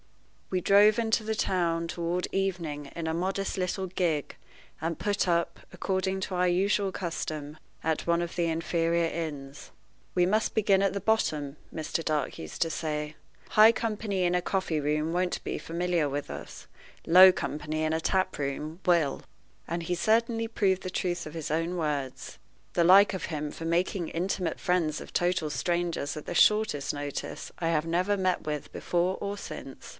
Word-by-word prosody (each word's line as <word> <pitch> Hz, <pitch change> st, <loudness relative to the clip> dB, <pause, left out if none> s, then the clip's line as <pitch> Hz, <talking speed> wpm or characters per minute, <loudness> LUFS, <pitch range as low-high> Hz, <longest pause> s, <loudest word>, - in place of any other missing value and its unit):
We 185 Hz, -1 st, 0 dB
drove 205 Hz, +4 st, +5 dB
into 225 Hz, -1 st, +1 dB
the 220 Hz, 0 st, -2 dB
town 170 Hz, -4 st, 0 dB
toward 170 Hz, +2 st, -2 dB
evening 170 Hz, -7 st, -2 dB
in 165 Hz, -1 st, -4 dB
a 160 Hz, -, 0 dB
modest 190 Hz, +3 st, -1 dB
little 190 Hz, +1 st, -1 dB
gig, 175 Hz, -6 st, -1 dB, 0.5 s
and 165 Hz, 0 st, -2 dB
put 205 Hz, -1 st, 0 dB
up, 170 Hz, -1 st, 0 dB
according 190 Hz, 0 st, -1 dB
to 185 Hz, 0 st, -3 dB
our 180 Hz, 0 st, +2 dB
usual 195 Hz, +2 st, +2 dB
custom, 155 Hz, -4 st, -4 dB, 0.3 s
at 160 Hz, -1 st, 0 dB
one 170 Hz, 0 st, +3 dB
of 175 Hz, 0 st, -4 dB
the 170 Hz, -1 st, +1 dB
inferior 165 Hz, +1 st, +1 dB
inns. 145 Hz, -4 st, -5 dB, 0.4 s
"We 180 Hz, -1 st, +3 dB
must 215 Hz, +4 st, +1 dB
begin 200 Hz, -3 st, +3 dB
at 195 Hz, -, +2 dB
the 200 Hz, -, -3 dB
bottom," 155 Hz, -9 st, 0 dB, 0.2 s
Mr. 160 Hz, +1 st, -2 dB
Dark 150 Hz, -4 st, -1 dB
used 80 Hz, 0 st, -8 dB
to 165 Hz, -, -3 dB
say. 150 Hz, -1 st, -3 dB, 0.3 s
"High 215 Hz, +1 st, +7 dB
company 215 Hz, -4 st, -2 dB
in 175 Hz, 0 st, +2 dB
a 180 Hz, -, +2 dB
coffee 175 Hz, -5 st, -1 dB
room 150 Hz, +2 st, 0 dB
won't 180 Hz, 0 st, 0 dB
be -, -, -2 dB
familiar 170 Hz, -2 st, -1 dB
with 145 Hz, +1 st, -4 dB
us; -, -, -8 dB, 0.4 s
low 185 Hz, +3 st, +9 dB
company 155 Hz, -2 st, -3 dB
in 155 Hz, 0 st, +1 dB
a 160 Hz, -, 0 dB
tap 185 Hz, +2 st, 0 dB
room 150 Hz, +4 st, -4 dB
will." 170 Hz, -6 st, +2 dB, 0.5 s
And 170 Hz, +1 st, -2 dB
he 175 Hz, +2 st, -1 dB
certainly 225 Hz, +3 st, +1 dB
proved 190 Hz, -4 st, +1 dB
the 185 Hz, -, -4 dB
truth 175 Hz, -1 st, -2 dB
of 155 Hz, +1 st, -8 dB
his 160 Hz, -3 st, -4 dB
own 165 Hz, +3 st, 0 dB
words. 145 Hz, -5 st, -3 dB, 0.3 s
The 170 Hz, -, +3 dB
like 195 Hz, +4 st, +7 dB
of 190 Hz, -, -3 dB
him 150 Hz, -2 st, -4 dB
for 165 Hz, -, -7 dB
making 170 Hz, +1 st, 0 dB
intimate 180 Hz, +1 st, -2 dB
friends 165 Hz, -4 st, +1 dB
of -, -, -11 dB
total 175 Hz, -3 st, +1 dB
strangers 170 Hz, -3 st, -1 dB
at 150 Hz, -, -7 dB
the -, -, -5 dB
shortest 210 Hz, -10 st, +3 dB
notice 145 Hz, -1 st, -5 dB
I 165 Hz, -, 0 dB
have 160 Hz, -1 st, +1 dB
never 180 Hz, +5 st, +1 dB
met 185 Hz, -2 st, +1 dB
with 150 Hz, -1 st, -5 dB
before 180 Hz, +2 st, 0 dB
or 200 Hz, 0 st, -3 dB
since. -, -, -8 dB
175 Hz, 175 wpm, -28 LUFS, 155-190 Hz, 0.5 s, low